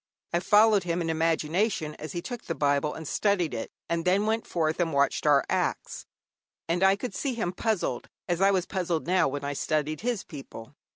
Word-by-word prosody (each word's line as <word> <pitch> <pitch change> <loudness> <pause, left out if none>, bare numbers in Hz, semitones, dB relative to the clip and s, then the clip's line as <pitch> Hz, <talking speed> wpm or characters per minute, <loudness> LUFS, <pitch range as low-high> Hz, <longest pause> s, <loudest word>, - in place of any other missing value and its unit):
I 170 - +3
followed 210 +2 +5
him 175 0 -1
in 165 -1 -1
imagination 160 +2 0
as 155 -2 -6
he 175 - -4
took 245 -3 -6
the 165 - -3
Bible 145 +1 +1
and 160 -1 -7
studied 190 -6 +1
it, 115 - -4 0.2
and 170 0 -1
then 190 +4 +2
went 220 +1 0
forth 160 -1 0
and 170 -2 +1
watched 140 +1 +1
our 140 -2 +5
acts, - - -2 0.6
and 170 +2 0
I 190 0 +5
could 205 +1 -5
see 265 +2 -2
him 180 -6 -2
puzzled, 185 - -1 0.2
as 175 0 -1
I 195 - +6
was 185 -3 +1
now 190 - -1
puzzled 170 -3 -1
when 145 -6 +1
I 140 0 -2
studied 155 +1 -1
his 235 -3 -1
people. 135 -6 -10
170 Hz, 205 wpm, -27 LUFS, 155-195 Hz, 0.6 s, I